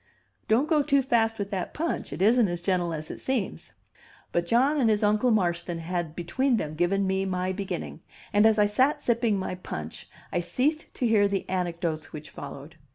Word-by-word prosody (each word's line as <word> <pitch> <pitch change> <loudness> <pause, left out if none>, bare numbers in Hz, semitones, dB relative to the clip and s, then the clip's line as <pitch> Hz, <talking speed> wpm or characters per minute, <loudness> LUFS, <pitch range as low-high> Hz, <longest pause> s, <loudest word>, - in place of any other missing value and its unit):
Don't 240 +7 +3
go 310 -2 +3
too 280 -1 +2
fast 225 -3 +2
with 200 -1 -4
that 190 -3 -3
punch; 330 +2 -2
it 155 +7 -2
isn't 230 +1 +5
as 175 -1 -3
gentle 175 -1 0
as 155 -1 -5
it - - -8
seems." 255 -7 -3 0.6
But 175 0 0
John 265 - +3
and 235 -4 +3
his 215 -1 +2
Uncle 210 +4 +3
Marston 175 -5 0
had 165 -1 -3
between 240 +9 0
them 155 -6 -3
given 175 +5 +1
me 190 0 0
my 185 -1 -1
beginning, 195 0 -5 0.3
and, 205 +2 +6
as 220 -1 +3
I 210 - +5
sat 260 +8 +2
sipping 230 -3 +2
my 185 - -3
punch, 80 - -7 0.2
I 175 - +2
ceased 275 - -1
to 250 - -1
hear 210 -3 +4
the 200 -1 -2
anecdotes 170 -3 -2
which 155 -1 -9
followed. 145 +3 -9
195 Hz, 195 wpm, -27 LUFS, 175-235 Hz, 0.6 s, and